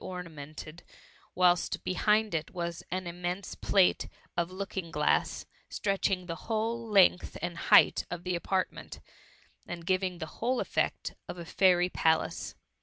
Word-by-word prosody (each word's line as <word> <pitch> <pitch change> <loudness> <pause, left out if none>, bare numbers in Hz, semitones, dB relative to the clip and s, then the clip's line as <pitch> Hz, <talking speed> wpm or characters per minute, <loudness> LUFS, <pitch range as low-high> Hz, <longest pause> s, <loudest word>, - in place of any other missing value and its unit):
25T - - -7
ornamented, 155 -2 -8 0.5
whilst 180 -1 +2
behind 210 +3 +2
it 155 -1 -2
was 170 -2 -4
an 185 +1 -3
immense 175 +2 -4
plate 190 -3 +2 0.3
of 170 0 0
looking 190 -2 -5
glaiss, 150 -2 +1 0.2
stretching 195 -2 0
the 170 - -4
whole 230 +1 -1
length 190 -3 +4
and 175 0 -3
height - - +5
of 175 -1 -5
the 180 - -2
apartment, 185 +2 -2 0.7
and 170 -1 -6
giving 185 0 0
the 165 - -4 0.2
whole 250 +3 +2
the - - 0
effect - - -1 0.2
of - - -5
a 170 - -7
fairy 180 0 +4
palace. 160 -3 0
180 Hz, 145 wpm, -30 LUFS, 170-195 Hz, 0.7 s, height